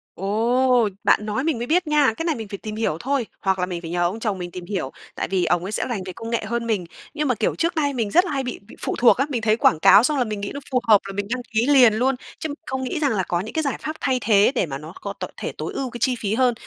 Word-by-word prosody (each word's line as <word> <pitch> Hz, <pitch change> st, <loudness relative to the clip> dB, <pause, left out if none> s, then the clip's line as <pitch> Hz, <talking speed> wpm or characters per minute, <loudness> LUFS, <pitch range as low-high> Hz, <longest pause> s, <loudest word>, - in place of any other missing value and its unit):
Ồ! 235 Hz, +4 st, +2 dB
Bạn 210 Hz, -, +3 dB
nói 215 Hz, +5 st, -2 dB
mình 320 Hz, -5 st, 0 dB
mới 240 Hz, +1 st, -4 dB
biết 345 Hz, +3 st, +2 dB
nha. 295 Hz, -5 st, +3 dB
Cái 330 Hz, -, -3 dB
này 325 Hz, -3 st, +1 dB
mình 225 Hz, -2 st, -6 dB
phải 200 Hz, 0 st, -6 dB
tìm 215 Hz, +1 st, -7 dB
hiểu 215 Hz, -8 st, -1 dB
thôi, 270 Hz, +1 st, -1 dB, 0.2 s
hoặc 190 Hz, -1 st, +1 dB
là 180 Hz, -, +1 dB
mình 180 Hz, -2 st, -5 dB
phải 165 Hz, -, -7 dB
nhờ 175 Hz, 0 st, 0 dB
ông 180 Hz, +6 st, -1 dB
chồng 215 Hz, -4 st, -1 dB
mình 175 Hz, -1 st, -6 dB
tìm 180 Hz, 0 st, -8 dB
hiểu, 180 Hz, -8 st, -3 dB, 0.2 s
tại -, -, -2 dB
vì 185 Hz, -2 st, 0 dB
ổng 175 Hz, +1 st, +1 dB
ấy 190 Hz, -, -4 dB
sẽ -, -, -1 dB
rành 225 Hz, -6 st, -2 dB
về 185 Hz, -, -6 dB
công 225 Hz, +5 st, -7 dB
nghệ 230 Hz, -1 st, -1 dB
hơn 235 Hz, +1 st, -2 dB
mình, 205 Hz, -6 st, 0 dB, 0.3 s
nhưng 300 Hz, 0 st, -1 dB
mà, 250 Hz, -, +2 dB
kiểu, 215 Hz, -, 0 dB
trước 335 Hz, +1 st, 0 dB
nay 290 Hz, -3 st, +1 dB
mình 225 Hz, -5 st, -2 dB
rất 355 Hz, +3 st, +5 dB
là 360 Hz, -, -4 dB
hay 275 Hz, -2 st, -1 dB
bị 250 Hz, -1 st, -5 dB
bị -, -, -13 dB
phụ -, -, -2 dB
thuộc 240 Hz, -, +5 dB
á. 270 Hz, -, +2 dB
Mình 245 Hz, -5 st, -2 dB
thấy 220 Hz, 0 st, +2 dB
quảng 165 Hz, -8 st, +3 dB
cáo 200 Hz, +6 st, +7 dB
xong 295 Hz, +3 st, +1 dB
là 255 Hz, -, +3 dB
mình 215 Hz, -3 st, -4 dB
nghĩ 200 Hz, -, -4 dB
nó 280 Hz, -, -5 dB
phù 255 Hz, -, +3 dB
hợp 210 Hz, -3 st, +6 dB
là 195 Hz, -, -6 dB
mình 200 Hz, 0 st, -3 dB
đăng 255 Hz, -, -3 dB
ký 225 Hz, +3 st, +2 dB
liền 260 Hz, -6 st, +6 dB
luôn 255 Hz, +4 st, +1 dB, 0.2 s
chứ 315 Hz, -, -3 dB, 0.2 s
không 260 Hz, 0 st, -3 dB
nghĩ 260 Hz, +5 st, -2 dB
rằng 290 Hz, -3 st, +1 dB
là 200 Hz, -4 st, 0 dB
có 175 Hz, -1 st, -1 dB
những 210 Hz, +5 st, -6 dB
cái 315 Hz, -, 0 dB
giải 280 Hz, -, -1 dB
pháp 310 Hz, -, -3 dB
thay 260 Hz, -2 st, +1 dB
thế 205 Hz, 0 st, +4 dB
để 235 Hz, -, +2 dB
mà 135 Hz, -4 st, -5 dB
nó 155 Hz, +4 st, -10 dB
có -, -, -4 dB
tội -, -, -5 dB
thể -, -, -3 dB
tối -, -, -4 dB
ưu 265 Hz, -2 st, -3 dB
cái 240 Hz, -, -8 dB
chi 255 Hz, 0 st, +2 dB
phí 205 Hz, -1 st, -1 dB
hơn. 250 Hz, 0 st, +3 dB
230 Hz, 325 wpm, -22 LUFS, 200-265 Hz, 0.3 s, cáo